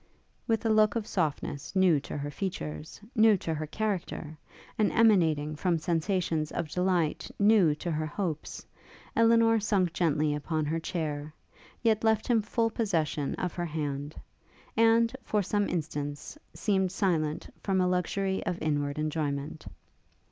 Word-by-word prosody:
With 225 -1 0
a - - +3
look 215 0 +4
of 225 -3 -1
softness 155 -4 -2
new 185 -5 +4
to 145 - -6
her 145 0 -4
features, 75 - -5 0.2
new 220 -2 +6
to 165 -2 -3
her 155 0 -4
character, 185 -5 -3 0.4
and 215 - +2
emanating 160 -9 +3
from 170 +2 +1
sensations 165 -1 -1
of 165 - -3
delight 180 -2 0
new 200 -7 +5
to 170 +3 -4
her 155 0 -1
hopes, 160 -2 -4 0.5
Elinor 230 0 +5
sunk 195 -5 +1
gently 155 -4 +1
upon 155 +1 -2
her 160 +2 -1
chair, 155 -3 -3 0.5
yet 220 -2 +2
left 220 -1 +2
him 235 -3 +3
full 225 +2 0
possession 160 -10 -1
of 180 -2 -3
her 175 - -3
hand; 145 -2 -4 0.6
and, 230 +1 +4
for 210 -1 0
some 205 +2 0
instants, 150 - -4 0.2
seemed 190 -3 +1
silent 165 -6 -1
from 195 -2 0
a 185 - +3
luxury 190 +2 0
of 180 -2 -1
inward 145 -2 -1
enjoyment. 150 -1 -3
175 Hz, 145 wpm, -29 LUFS, 150-205 Hz, 0.6 s, new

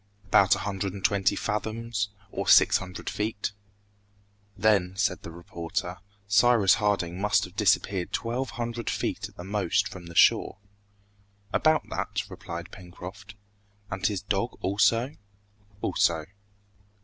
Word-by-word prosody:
"About 100 -1 +5
a - - -5
hundred 95 -2 -2
and 100 -1 -6
twenty 100 -4 +3
fathoms, 110 0 -2 0.2
or - - -4
six - - +7
hundred 90 -1 -8
feet." 105 -1 -2 1.1
"Then," 95 -3 +2
said 100 -4 +1
the - - -8
reporter, 85 +2 -5 0.3
"Cyrus 105 -1 +5
Harding 100 -4 0
must 105 0 +3
have 90 0 -8
disappeared 100 -3 +1
twelve 120 +2 -2
hundred 120 0 -3
feet - - -2
at - - -23
the 90 - -7
most 100 +1 0
from 95 -4 -10
the 85 - -11
shore?" - - +4 1.0
"About 155 0 +3
that," - - -3
replied 85 +2 -7
Pencroft. 90 +2 -10 0.6
"And 95 0 -5
his 100 -2 -2
dog 100 +4 -1
also?" 110 +7 +2 0.6
"Also." 80 -2 +1
100 Hz, 130 wpm, -27 LUFS, 90-105 Hz, 1.1 s, six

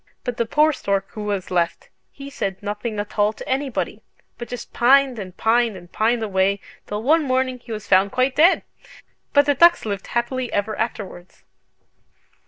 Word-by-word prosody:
But 245 -2 -4
the 235 - 0
poor 305 +5 +3
stork 195 -5 -2
who 215 -2 -6
was 200 -3 -3
left, 170 -2 -1 0.2
he 280 0 -10
said 195 -7 -4
nothing 210 +1 -4
at 205 +1 -5
all 205 +1 +3
to - - -10
anybody, 265 -1 -2 0.4
but 240 - -6
just 245 - -8
pined 260 0 +4
and 185 -2 -8
pined 230 -2 +2
and 175 -1 -14
pined 225 +1 +1
away, 200 -1 +1 0.3
till 210 +1 -4
one 315 +6 +4
morning 260 -2 0
he 240 -1 -12
was 215 -2 -6
found 195 +1 +4
quite 255 +1 +1
dead! 335 +5 +5 0.7
But 285 0 +5
the 290 - +3
ducks 340 +2 +5
lived 200 -2 -4
happily 245 +1 -2
ever 205 +1 -1
afterwards!" 195 -5 -6
225 Hz, 180 wpm, -22 LUFS, 200-260 Hz, 0.7 s, dead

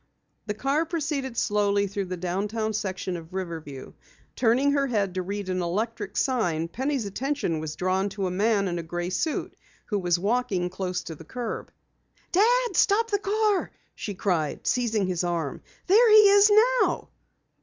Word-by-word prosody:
The 210 - -2
car 280 +8 0
proceeded 290 -7 -3
slowly 205 -1 +2
through 200 0 -3
the 185 0 -5
downtown 205 +5 -2
section 190 -3 -3
of 170 +2 -9
Riverview. 160 -7 -6 0.4
Turning 255 +4 +3
her 280 -1 +1
head 205 -6 0
to 185 - -2
read 200 +2 -4
an 185 -1 -1
electric 205 +3 -3
sign, 175 - 0
Penny's 265 +3 -2
attention 240 - -2
was 155 -1 -5
drawn 185 +2 0
to 195 0 -3
a 180 - -1
man 200 +1 +1
in 175 -1 -2
a - - -2
gray 175 +2 -4
suit 300 - -2 0.3
who 205 -3 -1
was 175 -2 +1
walking 200 -3 0
close 185 -1 -3
to 165 - -7
the 160 - -12
curb. 235 +7 -5 0.6
"Dad, 475 +6 +3
stop 445 +3 +3
the 405 - +2
car!" 415 0 +1 0.2
she 205 - -6
cried, 170 -6 -1
seizing 225 -5 +1
his 180 -1 -1
arm. 170 -5 -2 0.2
"There 445 +5 +6
he 425 -1 +8
is 405 +1 +6 0.3
now!" - - 0
205 Hz, 165 wpm, -26 LUFS, 180-270 Hz, 0.6 s, he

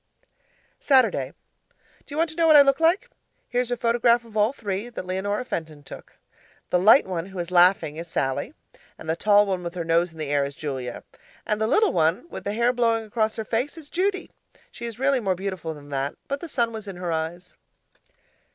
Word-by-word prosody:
Saturday 265 -3 +3 0.8
Do - - -16
you - - -5
want 325 0 +1
to - - -12
know 330 -1 +3
what 310 - +7
I 285 - +10
look 275 +1 +2
like? 345 +9 +2 0.4
Here's 245 0 -1
a 245 - -1
photograph 235 0 +2
of 225 -2 -16
all 210 +2 +3
three 210 -3 -4
that 230 - -7
Leonora 205 +5 -2
Fenton 155 - -5
took. - - -12 0.6
The 180 - +3
light 215 +9 +6
one 180 -2 -4
who 195 -1 -11
is 175 0 -4
laughing 175 -4 +4
is 170 +1 -6
Sallie, 135 -5 -2 0.4
and 160 - -11
the 160 - 0
tall 205 +3 +4
one 190 -2 -2
with 170 0 -6
her 170 -2 -3
nose 170 +1 +2
in 165 - -17
the 155 -2 -4
air 145 -1 +2
is 140 0 -5
Julia, 130 -5 -5 0.4
and 210 0 -1
the 220 - +2
little 420 - +3
one 165 - +1
with - - -8
the 200 - -2
hair 235 +3 +2
blowing 230 -2 +1
across 220 0 -1
her 220 - -4
face 250 +9 -2
is 305 -3 -11
Judy 380 +2 -1 0.4
she 235 - -8
is 230 -2 -6
really 270 +1 +2
more 195 -5 0
beautiful 185 -4 -5
than 145 -1 -13
that, 140 0 -2
but 280 0 -3
the 340 - -7
sun 235 -6 0
was 215 -2 -7
in 195 - -6
her 175 -1 -4
eyes. 165 +3 -4
205 Hz, 215 wpm, -24 LUFS, 170-245 Hz, 0.8 s, I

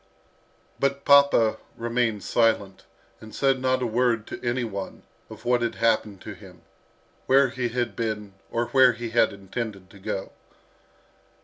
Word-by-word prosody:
But 140 0 -1
papa 140 -6 +5 0.2
remained 115 -3 -1
silent, 105 -5 +1 0.3
and 110 -1 -12
said 135 -1 +2
not 130 0 +1
a - - +1
word 115 -1 +1
to - - -8
any 120 +1 0
one 100 -4 -6 0.3
of - - -12
what 120 0 +2
had 120 -1 -1
happened 110 -4 0
to - - -7
him, - - -15 0.6
where 135 0 +5
he 125 -1 -2
had 120 -3 -2
been, 105 -3 -3 0.2
or 120 +1 -1
where 130 -2 +5
he 115 0 -6
had 115 -1 +3
intended 100 -1 -6
to 100 - -15
go. 95 0 -4
115 Hz, 150 wpm, -25 LUFS, 105-125 Hz, 0.6 s, papa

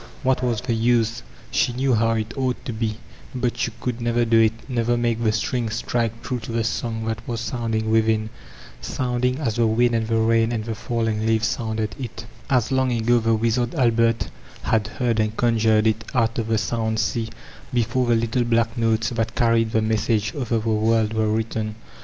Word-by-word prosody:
What 130 -1 +2
was 120 -3 0
the 125 -1 -1
use? 115 0 +1 0.3
She 120 - +1
knew 130 +1 +1
how 115 0 +2
it 110 +1 -3
ought 130 -2 -2
to 120 - -3
be, 110 -1 -2 0.4
but 125 -1 -1
she - - -1
could 125 -1 -3
never 120 0 +1
do 115 0 +4
it, 110 0 +4
— - - -19
never 120 -2 0
make 120 -1 0
the 110 - +3
strings 115 0 -1
strike 115 -1 -2
tme 125 -3 -3
to 110 - -7
the 115 0 0
song 110 0 -2
that 110 0 -2
was 115 -1 -2
sounding 115 -2 -2
within, 110 -1 +2 0.5
sounding 125 0 -1
as 120 -7 -2
the 115 -1 +3
wind 120 +2 +2
and 115 -1 0
the 115 0 +1
rain 115 0 +3
and 110 -2 -2
the 115 - -3
falling 110 -1 -1
leaves 115 0 +2
sounded 110 -3 -2
tt, 115 +3 -7 0.2
as 125 -3 +2
long 130 -1 +2
ago 120 +1 +2
the 115 0 +2
wizard 115 +3 0
Albert 115 -4 +2 0.3
had 110 -2 +1
heard 120 -1 -1
and 110 0 0
conjured 110 -2 +3
h 110 -1 +3 0.2
out 115 -1 +1
of 115 - -2
the 115 0 +2
sound 110 +1 -1
sea, 110 0 -1 0.4
before 120 +1 +1
the 120 - +4
little 115 +2 +1
black 115 0 +1
notes 115 -1 +1
that 115 -1 -2
carried 115 -1 +2
the 110 -1 +1
message 110 0 0
over 125 -5 -1
the 110 0 -3
world 110 0 +2
were 110 -1 +1
written. 110 0 -2
115 Hz, 200 wpm, -23 LUFS, 110-120 Hz, 0.5 s, do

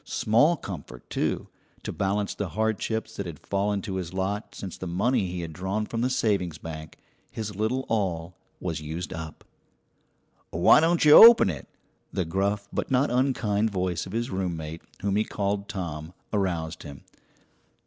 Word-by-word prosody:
Small 145 +11 +3
comfort, 90 - -8
too, - - -1 0.4
to - - -3
balance 100 +1 -1
the 100 -3 -4
hardships 110 +3 -1
that 100 - -4
had 80 -3 -7
fallen 100 0 -1
to 95 -4 -3
his 90 -1 -5
lot 100 +3 -2
since 95 -3 -6
the 95 - -6
money 95 +4 +1
he 90 0 -4
had 80 -1 -6
drawn 95 +6 -2
from 115 +1 -3
the 125 - +2
savings 100 -10 0
bank 80 -1 -8 0.3
his 105 -2 -5
little 110 +6 -1
all 90 -6 -1 0.2
was 80 -4 -3
used 80 +3 -5
up. 80 -1 -7 1.1
"Why - - +6
don't 165 +1 +3
you 150 - +7
open 225 - +10
it?" 75 - -8 0.4
The 90 - -1
gruff 100 +4 -1
but - - -2
not 135 +1 +2
unkind 115 -5 +1
voice 90 -3 -2
of - - -9
his 120 +4 -2
roommate, 85 -4 -3 0.2
whom 100 0 +1
he 105 - +3
called 100 -1 -2
Tom, 85 -4 -5 0.2
aroused 85 -5 -1
him. 70 -1 -10
100 Hz, 165 wpm, -26 LUFS, 85-110 Hz, 1.1 s, open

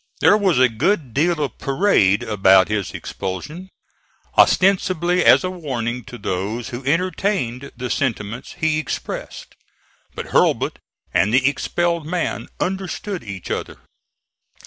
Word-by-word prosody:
There - - +6
was 195 -7 +2
a 130 0 +6
good 130 - -1
deal 165 +4 +1
of 135 - -5
parade 135 - +2
about 95 -4 +4
his 105 -3 -2
expulsion, 150 - -6 0.7
ostensibly 180 -2 +3
as - - +6
a 185 - -2
warning 125 -8 -4
to 120 - -9
those 105 +4 -3
who 120 +2 -6
entertained 165 - -1
the 125 0 -4
sentiments 120 -1 -3
he 160 -3 0
expressed; 155 - -6 0.6
but - - -6
Hurlbut - - +2 0.3
and 100 - +3
the 130 +2 +4
expelled 170 +3 -1
man 180 +1 -2
understood 190 +1 -3
each 100 -4 -7
other. - - -4
140 Hz, 125 wpm, -21 LUFS, 115-180 Hz, 0.7 s, There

